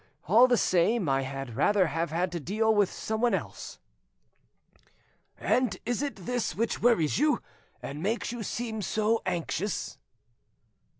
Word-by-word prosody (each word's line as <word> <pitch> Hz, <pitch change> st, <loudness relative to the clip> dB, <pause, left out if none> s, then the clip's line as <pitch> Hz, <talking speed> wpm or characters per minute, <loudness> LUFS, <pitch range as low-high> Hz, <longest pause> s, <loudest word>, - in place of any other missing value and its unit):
All 230 Hz, +8 st, +7 dB
the 245 Hz, -1 st, +3 dB
same, 185 Hz, +2 st, +2 dB
I 135 Hz, 0 st, +2 dB
had 135 Hz, -3 st, -6 dB
rather 205 Hz, -, +3 dB
have 165 Hz, +1 st, -2 dB
had 175 Hz, +3 st, -1 dB
to 175 Hz, -, -3 dB
deal 215 Hz, +8 st, +1 dB
with 205 Hz, -3 st, +2 dB
someone 220 Hz, +2 st, 0 dB
else." -, -, -6 dB, 1.6 s
"And 245 Hz, -8 st, +1 dB
is 240 Hz, +2 st, -1 dB
it 275 Hz, -11 st, -5 dB
this 245 Hz, -2 st, -1 dB
which 230 Hz, +2 st, -1 dB
worries 225 Hz, -10 st, +3 dB
you, 300 Hz, +1 st, +3 dB, 0.4 s
and 145 Hz, +2 st, -6 dB
makes 220 Hz, +6 st, -1 dB
you 240 Hz, -1 st, -5 dB
seem 220 Hz, +1 st, -3 dB
so 215 Hz, +4 st, +1 dB
anxious?" 175 Hz, +3 st, -2 dB
210 Hz, 140 wpm, -28 LUFS, 170-235 Hz, 1.6 s, All